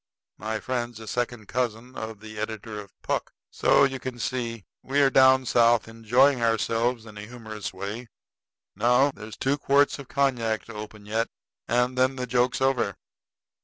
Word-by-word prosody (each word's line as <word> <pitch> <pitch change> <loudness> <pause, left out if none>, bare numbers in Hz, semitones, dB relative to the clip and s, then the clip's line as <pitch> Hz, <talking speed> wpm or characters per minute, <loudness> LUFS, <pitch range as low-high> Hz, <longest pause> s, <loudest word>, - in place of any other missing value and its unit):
My 110 0 -3
friend's 120 -2 -3
a 110 - -10
second 120 -2 -3
cousin 125 0 -2
of 110 -1 -6
the 110 -1 -9
editor 110 0 -5
of 100 -2 -12
Puck. - - -2 0.2
So - - +4
you 135 -1 +1
can 130 -1 -5
see. 115 -3 -3 0.2
We 140 +2 0
are 135 -1 +5
down 130 0 +6
South 120 -1 +4
enjoying 120 +4 +3
ourselves 115 +1 +1
in 105 -2 -10
our - - -7
humorous 110 -3 -7
way. 100 +6 -6 0.7
Now, 125 +6 +4
there's 110 -4 -10
two 140 +2 0
quarts 140 +1 +3
of 140 - -9
cognac 125 -6 0
to 115 - -10
open 105 0 -9
yet, 110 +2 0 0.4
and 125 +1 +1
then 130 +1 +3
the 125 -1 -3
joke's 125 +1 +1
over." 130 -7 +1
120 Hz, 165 wpm, -26 LUFS, 110-130 Hz, 0.7 s, down